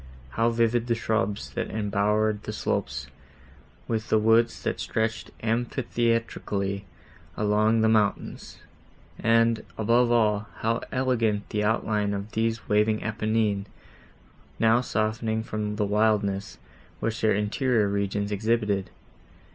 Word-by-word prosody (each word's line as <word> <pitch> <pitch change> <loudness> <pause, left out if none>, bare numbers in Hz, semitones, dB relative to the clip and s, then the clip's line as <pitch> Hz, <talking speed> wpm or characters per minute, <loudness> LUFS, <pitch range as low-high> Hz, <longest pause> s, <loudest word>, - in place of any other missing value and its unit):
How 115 - +2
vivid 115 0 +1
the 115 - +2
shrubs 110 -2 -1
that - - -3
embowered 105 0 0
the - - -5
slopes, - - -2 0.8
with 110 -1 -2
the 110 - +4
woods, 115 +2 +3
that - - -2
stretched 110 0 -2
amphitheatrically 115 -4 -1 0.5
along 105 +2 +2
the 110 - +4
mountains! 110 -2 0 0.6
and, 115 0 +3
above 120 +2 +3
all, 105 -3 +2
how 115 +2 0
elegant 115 -5 0
the 105 0 -1
outline 105 -1 0
of 100 +2 -6
these 115 0 -1
waving 105 +1 +2
Apennines, 110 -2 0 0.9
now 115 +2 +4
softening 110 -1 -1
from 105 -1 -3
the 105 -1 0
wildness, 105 -1 +1 0.4
which 115 +1 -2
their 110 -2 +3
interior 105 +2 +1
regions 100 0 -1
exhibited! 105 -2 0
110 Hz, 115 wpm, -26 LUFS, 105-115 Hz, 0.9 s, the